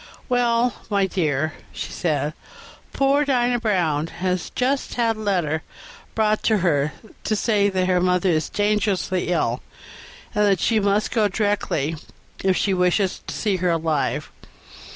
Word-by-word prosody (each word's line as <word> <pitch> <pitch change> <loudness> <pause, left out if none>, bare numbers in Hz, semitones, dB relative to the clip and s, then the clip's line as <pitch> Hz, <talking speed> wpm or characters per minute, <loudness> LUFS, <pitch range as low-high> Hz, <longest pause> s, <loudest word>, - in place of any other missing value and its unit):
"Well, 245 -1 +2
my 200 -2 +2
dear," 155 -5 0 0.2
she - - -6
said, 150 -3 -1 0.6
"poor 275 +1 +2
Dinah 245 -3 +1
Brown 170 -9 +1
has 180 +1 -2
just 265 +2 0
had 230 -2 +1
a - - -10
letter 175 -7 0 0.5
brought 215 -1 +2
to 170 -9 +2 0.5
say 205 -1 +2
that 185 -1 0
her 180 -1 +2
mother 180 +1 +2
is 160 -2 +1
dangerously 205 -3 0
ill, 175 -1 0 0.7
and 210 - +2
that 195 -3 +3
she 225 +4 +2
must 205 +1 +1
go 220 -3 +3
directly 200 -7 -1 0.5
if 190 -1 +2
she 195 - +1
wishes 180 +1 +1
to - - -4
see 205 -3 0
her 180 0 0
alive. 160 -3 -1
195 Hz, 140 wpm, -22 LUFS, 175-215 Hz, 0.7 s, that